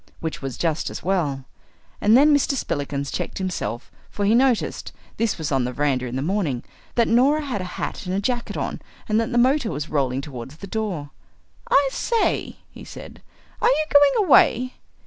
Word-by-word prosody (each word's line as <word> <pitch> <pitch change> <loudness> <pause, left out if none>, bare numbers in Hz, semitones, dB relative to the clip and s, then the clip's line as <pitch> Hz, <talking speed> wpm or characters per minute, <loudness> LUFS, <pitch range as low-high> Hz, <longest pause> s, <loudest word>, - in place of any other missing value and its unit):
Which 160 -1 -4
was 135 -2 -5
just 165 -2 -1
as - - -7
well. 150 -8 -1 0.6
And 215 +3 +6
then 295 +3 +6
Mr. 285 0 +1
Spillikins 140 - -3
checked - - -4
himself, 150 - -4 0.2
for 205 - -2
he 210 - +4
noticed 250 -1 +1 0.3
this 225 -1 0
was 160 -1 -3
on 135 -2 +2
the 125 - -2
verandah 130 -2 0
in 120 - -5
the 130 - -1
morning 165 -8 -1 0.3
that 235 -1 +3
Norah 275 +6 +3
had 245 -8 -3
a 180 - -7
hat - - -4
and 190 +2 -1
jacket 240 +1 -2
on - - -3 0.3
and 215 +1 +2
that 230 +3 -1
the 240 - 0
motor 260 0 +3
was 150 -2 -4
rolling 135 -3 0
towards 130 -1 -8
the 180 - -9
door. 190 -9 -3 0.6
"I 275 0 +5
say," 465 - 0 0.2
he - - -12
said, - - -11 0.4
"are 470 - +5
you 310 -11 +2
going 285 +8 +5
away?" 255 -5 +4
195 Hz, 185 wpm, -23 LUFS, -, 0.6 s, And